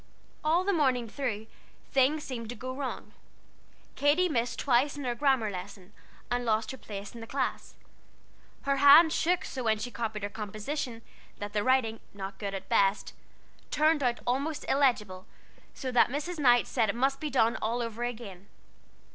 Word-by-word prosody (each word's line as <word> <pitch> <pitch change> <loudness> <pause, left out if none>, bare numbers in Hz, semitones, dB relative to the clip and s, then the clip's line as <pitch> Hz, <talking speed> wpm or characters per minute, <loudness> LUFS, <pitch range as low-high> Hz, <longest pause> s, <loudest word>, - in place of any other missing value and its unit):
All 325 +4 +3
the 400 +1 +1
morning 260 -7 +2
through, 225 -3 -3 0.5
things 275 +3 +3
seemed 230 -4 -6
to 245 - -5
go 255 +3 -6
wrong. 270 -1 -5 0.8
Katy 310 +6 +3
missed 235 -4 -1
twice 275 +2 +2
in 285 - -5
her 245 -2 -1
grammar 260 -4 +1
lesson, 190 +1 -9 0.4
and 245 0 0
lost 220 0 0
her 265 - -8
place 200 -1 -8
in 235 - -9
the 225 - -8
class. 265 +1 -3 0.9
Her 275 0 +1
hand 290 +4 +8
shook 355 +1 +1
so 260 - -5
when 220 -1 +2
she 245 +3 -5
copied 220 -3 -4
her 205 - -2
composition, 225 +4 -5 0.3
that 205 0 -6
the 210 -1 0
writing, 250 -4 +2 0.2
not 195 0 -7
good 200 -2 -3
at 195 - -7
best, 195 +1 +2 0.6
turned 310 0 +3
out 245 -2 0
almost 285 +5 -1
illegible, 210 -9 +1 0.5
so 260 -2 -4
that 245 - +4
Mrs. 305 +6 -4
Knight 245 -4 +5
said 220 - 0
it 200 - -1
must 270 +3 +1
all - - -29
be 305 - -2
done 235 -4 +2
over 230 +1 -2
again. 215 -6 -6
245 Hz, 170 wpm, -29 LUFS, 215-280 Hz, 0.9 s, hand